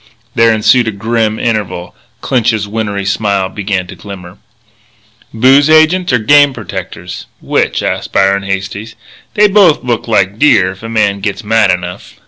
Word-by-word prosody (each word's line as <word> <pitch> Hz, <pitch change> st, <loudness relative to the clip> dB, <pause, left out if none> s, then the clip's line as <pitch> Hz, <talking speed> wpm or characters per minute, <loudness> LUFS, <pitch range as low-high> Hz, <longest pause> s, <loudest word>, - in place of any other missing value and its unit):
There 115 Hz, -2 st, +3 dB
ensued 110 Hz, +2 st, +2 dB
a -, -, 0 dB
grim 110 Hz, +1 st, -1 dB
interval. 105 Hz, -7 st, -3 dB, 0.3 s
Clinch's 110 Hz, -4 st, 0 dB
wintry 100 Hz, -2 st, -3 dB
smile 100 Hz, -1 st, -1 dB
began 100 Hz, -2 st, -3 dB
to 90 Hz, -, -11 dB
glimmer. 95 Hz, -2 st, -11 dB, 0.9 s
"Booze 135 Hz, +6 st, +4 dB
agents 155 Hz, +3 st, +3 dB
or 125 Hz, -, +3 dB
game 145 Hz, +5 st, +4 dB
protectors? 95 Hz, -4 st, -8 dB
Which?" -, -, -1 dB
asked -, -, -3 dB
Byron 100 Hz, 0 st, +2 dB
Hastings. 100 Hz, +3 st, -5 dB, 0.4 s
"They 210 Hz, 0 st, +5 dB
both 195 Hz, -8 st, +3 dB
look 120 Hz, -2 st, -2 dB
like 100 Hz, -2 st, 0 dB
deer 100 Hz, -11 st, +3 dB
if 95 Hz, -, -13 dB
a 115 Hz, -, -7 dB
man 105 Hz, -3 st, 0 dB
gits 100 Hz, +3 st, -4 dB
mad 110 Hz, -1 st, +2 dB
enough." 90 Hz, -1 st, -4 dB
105 Hz, 150 wpm, -12 LUFS, 100-120 Hz, 0.9 s, They